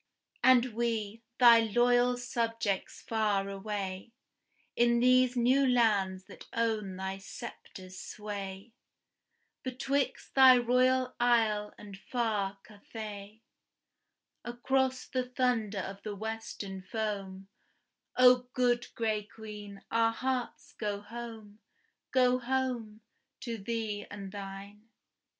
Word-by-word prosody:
And 255 -2 +5
we, 225 -2 -2 0.2
thy 235 -2 +8
loyal 245 +2 +3
subjects 230 -5 -2
far 210 -3 0
away, 195 +1 -5 0.6
In 235 0 +3
these 255 0 +4
new 250 +3 +3
lands 210 -7 +2
that - - -13
own 220 -4 -1
thy 190 +1 -4
sceptre's 185 -1 -10
sway, 200 +1 -7 0.9
Betwixt 265 +1 -2
thy 260 -2 +8
Royal 255 +1 +2
Isle 225 -4 +2
and 200 -2 -11
far 210 -4 -1
Cathay 210 0 -9 1.0
Across 260 +2 -1
the 255 -1 -2
thunder 235 -6 0
of 195 +1 -7
the 210 -2 -5
western 215 -2 -6
foam, 195 -2 -4 0.7
O 250 0 +6
good 245 -1 +1
gray 220 -2 0
Queen, 210 -2 -10
our 225 0 +3
hearts 255 +1 -3
go 205 -2 -2
home, 220 -1 -9 0.5
go 255 -1 +4
home, 245 -4 -2 0.4
To 230 -3 -4
thine 215 -1 -3
and 200 -2 -8
thee! 200 0 -8
225 Hz, 105 wpm, -31 LUFS, 205-245 Hz, 1.0 s, thy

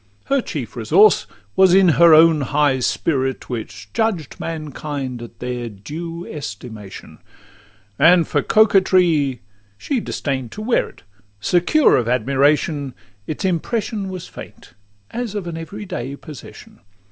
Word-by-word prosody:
Her 275 -1 +1
chief 130 - -6
resource 155 - +4 0.3
was 190 -1 +5
in 190 -2 +6
her 170 +1 +6
own 160 -1 +6
high 140 -1 +1
spirit, 130 0 -1
Which 105 -3 -7
judged 185 - -1
mankind 145 -5 -5
at 115 -1 -11
their 125 0 -4
due 165 - -7
estimation; 105 -6 -9 0.8
And 175 0 +5
for 145 - +1
coquetry, 180 - +3 0.4
she 275 - -2
disdain'd 135 - -4
to 215 - -7
wear 235 +2 +1
it: - - -20 0.4
Secure 180 - +3
of 120 -2 -1
admiration, 140 +2 +1 0.3
its 155 - -4
impression 200 +3 -2
Was 185 -2 -7
faint, - - -12 0.4
as 235 -3 -4
of 200 -3 -3
an 170 -1 -5
every 200 +6 -7
day 140 -7 -5
possession. 150 -1 -12
155 Hz, 130 wpm, -20 LUFS, 130-185 Hz, 0.8 s, in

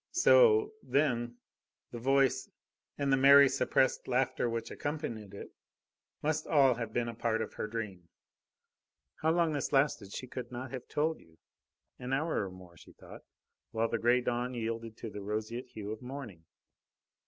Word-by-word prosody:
So, 440 +1 +5
then, 120 -5 0 0.5
the 120 - -6
voice 135 +2 +2 0.5
and 140 -1 +1
the - - +4
merry, 140 +1 +8
suppressed 130 0 +1
laughter 130 -1 0
which 115 0 -4
accompanied 115 -10 -5
it, - - -9 0.7
must 155 +1 -1
all 140 -4 +5
have 115 -2 -5
been 120 +1 -1
a 115 - -4
part 115 -1 -1
of - - -4
her - - -4
dream. 105 -6 -6 1.1
How 160 - +2
long 170 -1 +2
this 145 - -2
lasted 135 -8 +1
she 130 - -5
could 125 -1 -7
not 125 +1 -6
have 130 -2 -7
told 155 +2 -1
you. 80 0 -22 0.6
An 125 +1 -4
hour 145 -7 0
and 95 - -10
more, 90 -2 -14
she - - -16
thought, - - -13 0.5
while 115 0 0
the 115 - -1
grey 120 +2 +3
dawn 125 +1 -2
yielded 115 -1 -4
to 115 - -7
the 105 - -7
roseate 110 +4 -4
hue 105 -1 -7
of 110 - -6
morning. 125 -10 -8
120 Hz, 165 wpm, -31 LUFS, 110-140 Hz, 1.1 s, merry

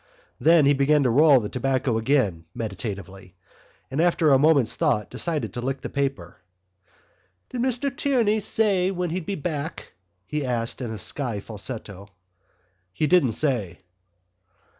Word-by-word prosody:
Then 165 -2 +5
he 140 - +5
began 145 +1 +3
to 125 - +2
roll 145 +1 +6
the 105 - -4
tobacco 130 -1 -1
again 110 - 0
meditatively 95 -3 -6 0.6
and 140 +4 0
after 170 -3 +3
a 135 - +5
moment's 145 -6 +3
thought 105 -1 0
decided 165 -4 -2
to 120 - -4
lick 135 +1 -3
the - - -5
paper. 135 - -3 1.1
"Did 245 - -4
Mr 260 +1 -1
Tierney 235 -7 +1
say 195 -3 +1
when 180 -3 -3
he'd 175 -1 -4
be 200 - -2
back?" 155 -1 -5 0.3
he 150 +4 -3
asked 120 -1 -2
in 125 - -3
a 110 - -5
husky 115 +1 0
falsetto. 100 -1 -7 0.8
"He 95 +12 -1
didn't 150 -8 +3
say." 120 - 0
135 Hz, 145 wpm, -24 LUFS, 110-165 Hz, 1.1 s, roll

